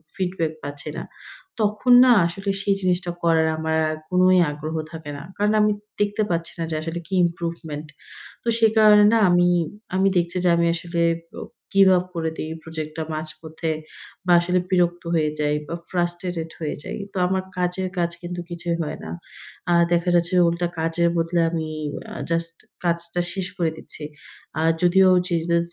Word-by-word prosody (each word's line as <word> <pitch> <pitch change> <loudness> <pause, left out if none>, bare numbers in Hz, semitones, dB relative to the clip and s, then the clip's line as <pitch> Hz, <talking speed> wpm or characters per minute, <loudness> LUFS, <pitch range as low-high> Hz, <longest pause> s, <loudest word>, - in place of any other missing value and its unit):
feedback 180 -4 -1
পাচ্ছি 145 +1 -6
না, - - -4 0.6
তখন 215 +4 +3
না 255 - +6
আসলে 195 +4 -3
সেই 200 0 +2
জিনিসটা 180 -1 0
করার 160 -1 +3
আমার 160 0 -1
আর 155 - -3
কোনই 185 0 +5
আগ্রহ 155 +2 -5 0.2
থাকে 160 -3 -7
না। 140 - -8
কারণ 210 +1 +2
আমি 210 0 +4 0.3
দেখতে 205 +1 +1
পাচ্ছি 165 -1 -2
না - - 0
যে - - -1
আসলে 165 +2 -4
কি 195 - -8
improvement। 165 -3 -4 0.6
তো - - -9
সে 225 -1 +5
কারণে 210 -1 +7
না - - +5
আমি 175 0 +4 0.5
আমি 190 +1 +3
দেখছি 175 +1 0
যে - - +5
আমি 170 0 +2
আসলে 170 0 -3 0.4
ও - - -6 0.3
give 195 -1 +6
up 180 - -1
করে 160 -1 -1
দেই 155 - -4
project 155 -1 -5
টা 160 - -1
মাঝপথে 160 +1 -4 0.5
বা 180 - +2
আসলে 180 +1 +1
বিরক্ত 175 -1 +1
হয়ে 155 -2 +2
যাই 150 0 +1
বা 170 - -4
frustrated 175 -2 -2
হয়ে 155 -2 -3
যাই। - - -5 0.2
তো - - -6
আমার 190 0 0
কাজের 180 +1 -1
কাজ 170 -1 +1
কিন্তু 175 0 -5
কিছুই 170 0 -2
হয় 150 - -4
না। 80 - -6 0.6
আর 170 0 +5
দেখা 170 +1 +2
যাচ্ছে 175 +2 +2
যে - - +6
উল্টা 170 +1 -1
কাজের 165 +1 +1
বদলে 170 +1 +1
আমি 160 -2 -2 0.5
আ - - -8 0.2
just 165 0 0 0.3
কাজটা 170 0 0
শেষ 190 -2 -2
করে 165 -3 +1
দিচ্ছি। 155 - -6 0.6
আর 160 - +3
যদিও 185 +1 +5 0.2
যে 175 - 0
দা 170 - +4
170 Hz, 180 wpm, -23 LUFS, 160-180 Hz, 0.6 s, কারণে